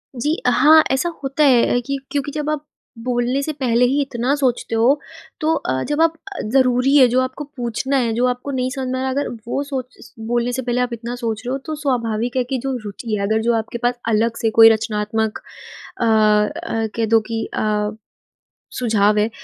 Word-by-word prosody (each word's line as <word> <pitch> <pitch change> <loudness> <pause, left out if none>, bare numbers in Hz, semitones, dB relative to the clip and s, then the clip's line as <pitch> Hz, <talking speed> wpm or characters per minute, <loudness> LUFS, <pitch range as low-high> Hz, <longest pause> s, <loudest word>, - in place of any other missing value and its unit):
जी, 295 +6 0
अ, - - +5
हाँ 310 +5 +6
ऐसा 265 +6 +1
होता 275 +3 0
है 245 -3 +4
कि 275 +1 -2
क्योंकि 285 0 -2
जब 300 0 -3
आप 305 -1 -3 0.4
बोलने 250 +2 0
से 310 +2 -3
पहले 250 -4 +2
ही 275 +4 +1
इतना 260 -1 -1
सोचते 255 -5 -1
हो 250 +6 +3 0.4
तो 315 +1 +2
अ, 130 - -2
जब 295 +2 +1
आप 330 0 +4 0.4
ज़रूरी 260 +1 +3
है 260 -3 +7
जो, 245 +2 +2
आपको 255 +3 -4
पूछना 245 +3 -1
है 235 -3 0
जो, 240 +3 +1
आपको 250 +3 -3
नहीं 255 -1 -1
समझ 260 0 -4
में 260 - -2
आ - - -2
रहा 265 - -1
है - - -2
अगर - - -5 0.2
वो 270 - -1
सोच 260 -3 -6 0.3
बोलने 240 +1 0
से 260 - -2
पहले 245 0 -1
आप 250 -1 -1
इतना 235 +1 -5
सोच 230 -3 -3
रहे 250 - -2
हो, 270 - -1
तो 310 +3 -6
स्वाभाविक 245 -5 -1
है 255 - +2
कि 260 +2 -3
जो 270 -1 -2
रुचि 215 +2 -4
है 200 - -3
अगर 220 +1 +1
जो 235 +1 +1
आपके 225 +1 -4
पास 245 0 +2
अलग 225 +1 +1
से 225 - +2
कोई 225 0 +11
रचनात्मक 220 0 -1 0.6
अ - - +2
अ, 215 0 +2
कह 230 - 0
दो 225 +1 +4
कि 225 -1 -2
अ, 210 -1 0 0.9
सुझाव 215 -3 +2
है 210 +1 +2
245 Hz, 215 wpm, -20 LUFS, 225-270 Hz, 0.9 s, कोई